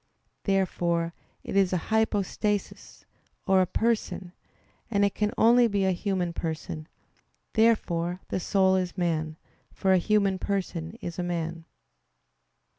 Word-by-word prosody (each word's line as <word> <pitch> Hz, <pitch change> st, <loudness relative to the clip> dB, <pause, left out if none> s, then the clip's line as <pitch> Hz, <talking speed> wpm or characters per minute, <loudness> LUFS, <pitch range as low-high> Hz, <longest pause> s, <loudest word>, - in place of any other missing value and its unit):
Therefore 170 Hz, -4 st, 0 dB, 0.3 s
it -, -, -5 dB
is 195 Hz, -2 st, +4 dB
a -, -, +3 dB, 0.2 s
"hypostasis" 210 Hz, -1 st, -1 dB, 0.4 s
or 190 Hz, -2 st, +4 dB
a 185 Hz, -, +2 dB
person; 215 Hz, -5 st, -1 dB, 0.6 s
and 200 Hz, -2 st, +3 dB
it 200 Hz, -, 0 dB
can 210 Hz, 0 st, 0 dB
only 240 Hz, +1 st, +6 dB
be 200 Hz, -3 st, 0 dB
a 190 Hz, -, +3 dB
human 180 Hz, -2 st, -1 dB
person. 160 Hz, -1 st, -4 dB, 0.7 s
Therefore 180 Hz, -6 st, +2 dB
the -, -, -1 dB
soul 190 Hz, 0 st, +3 dB
is 185 Hz, 0 st, -2 dB
man; 160 Hz, -3 st, -1 dB, 0.3 s
for 190 Hz, -1 st, +2 dB
a 185 Hz, -, +5 dB
human 195 Hz, 0 st, +2 dB
person 185 Hz, -3 st, -3 dB
is 170 Hz, +1 st, -5 dB
a -, -, 0 dB
man. 165 Hz, -1 st, -3 dB
190 Hz, 130 wpm, -27 LUFS, 170-205 Hz, 0.7 s, only